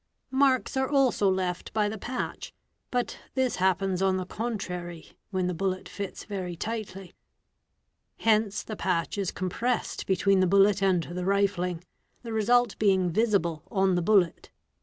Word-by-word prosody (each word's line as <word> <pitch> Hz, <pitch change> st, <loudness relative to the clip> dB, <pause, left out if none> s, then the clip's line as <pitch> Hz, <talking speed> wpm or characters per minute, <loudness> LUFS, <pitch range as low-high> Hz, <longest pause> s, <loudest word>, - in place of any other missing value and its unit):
' -, -, -48 dB
Marks 260 Hz, -1 st, +1 dB
are 265 Hz, 0 st, +1 dB
also 265 Hz, -8 st, +3 dB
left 185 Hz, -1 st, -2 dB
by 210 Hz, -1 st, +2 dB
the 215 Hz, 0 st, -5 dB
patch, 250 Hz, +4 st, -4 dB, 0.4 s
but 245 Hz, -1 st, -2 dB, 0.2 s
this 260 Hz, -2 st, +1 dB
happens 190 Hz, 0 st, +1 dB
on 190 Hz, -1 st, +2 dB
the 185 Hz, -, -3 dB
contrary 180 Hz, -6 st, -5 dB, 0.2 s
when 185 Hz, -3 st, -1 dB
the 180 Hz, -, -1 dB
bullet 185 Hz, +2 st, -2 dB
fits 200 Hz, -2 st, -6 dB
very 185 Hz, -4 st, -5 dB
tightly. 195 Hz, -2 st, -5 dB, 1.0 s
Hence 215 Hz, -2 st, +2 dB
the 215 Hz, -, -6 dB
patch 185 Hz, 0 st, -1 dB
is 195 Hz, -3 st, 0 dB
compressed 230 Hz, +7 st, -2 dB
between 195 Hz, +1 st, +3 dB
the 185 Hz, -, +3 dB
bullet 200 Hz, +2 st, +4 dB
and 185 Hz, -3 st, +3 dB
the 180 Hz, +2 st, -5 dB
rifling; 180 Hz, -3 st, 0 dB, 0.4 s
the 230 Hz, -2 st, -5 dB
result 240 Hz, +1 st, +2 dB
being 190 Hz, -4 st, +3 dB
visible 190 Hz, -6 st, +1 dB
on 190 Hz, -3 st, +2 dB
the 175 Hz, -, +1 dB
bullet. 185 Hz, -2 st, +2 dB
195 Hz, 155 wpm, -27 LUFS, 180-215 Hz, 1.0 s, bullet